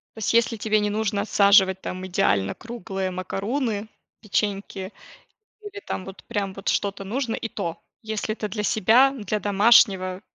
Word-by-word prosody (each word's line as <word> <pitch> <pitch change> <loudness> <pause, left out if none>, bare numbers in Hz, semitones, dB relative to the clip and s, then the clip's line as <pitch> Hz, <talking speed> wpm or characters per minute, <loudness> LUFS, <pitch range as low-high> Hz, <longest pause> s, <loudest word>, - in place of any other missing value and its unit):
То 220 - -10
есть, 220 - 0
если 230 -1 +3
тебе 215 0 +1
не 210 0 0
нужно 205 -1 -1
отсаживать, 200 -2 +4
там, 185 +1 -5
идеально 100 - +1
круглые 195 -5 -5
макаруны, 205 +4 -3 0.3
печеньки 200 -2 -2 0.7
или 405 -1 -9
там 185 - -4
вот, 195 0 -11
прям, 200 -2 -3
вот 195 0 -4
что-то 200 -1 -1
нужно, 230 +3 -2
и 225 - -5
то, 170 -5 -5 0.2
если 215 -1 -3
это 215 -1 -4
для 210 +1 -4
себя, 230 +7 +4
для 215 -5 -3
домашнего, 200 -2 +4
205 Hz, 155 wpm, -24 LUFS, 190-220 Hz, 0.7 s, отсаживать